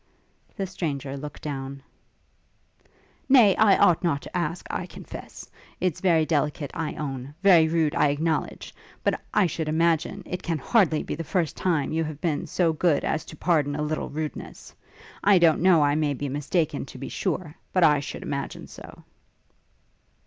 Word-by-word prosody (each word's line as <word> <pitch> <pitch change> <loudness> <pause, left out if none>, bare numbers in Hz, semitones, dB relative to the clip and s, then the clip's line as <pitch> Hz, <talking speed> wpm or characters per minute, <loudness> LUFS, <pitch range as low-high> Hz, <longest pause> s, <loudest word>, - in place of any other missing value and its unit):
The 195 - -2
stranger 145 -7 -4
looked 145 +1 -8
down. 135 -2 -5 1.5
'Nay, 235 -8 +7
I 210 -3 +5
ought 175 0 +4
not 145 -5 0
to - - -10
ask, 170 -1 -2
I - - -3
confess. - - -10 0.3
It's 185 -4 -1
very 170 -4 +4
indelicate, 150 -1 -1
I 160 -2 -3
own; 135 -1 -5
very 175 -5 +7
rude, 160 -2 +1
I 145 - +3
acknowledge; 155 +3 -2 0.3
but, - - 0
I 210 - +3
should 160 -2 -2
imagine, 165 +4 +1
it 180 - -5
can 165 -2 -2
hardly 160 - +2
be - - -4
the 165 - -4
first 165 -1 -1
time 160 -7 0
that - - -2
you 165 - +1
have 155 -2 -6
been 155 -3 -1
so 170 -3 +1
good 155 -1 +1
as 160 - -1
to - - -10
pardon 150 -5 +1
a 150 - -2
little 155 +1 -2
rudeness. 155 0 -6 0.5
I 200 -1 +6
don't 165 -3 +4
know, 175 -4 +5
I 145 0 +3
may 150 -1 0
be 140 +2 -4
mistaken, 145 +2 -1
to - - -11
be 135 - -6
sure, 175 -4 -3 0.2
but 185 - +2
I 150 -3 +5
should 140 - -6
imagine 140 -1 -4
so.' - - -13
155 Hz, 175 wpm, -25 LUFS, 145-175 Hz, 1.5 s, Nay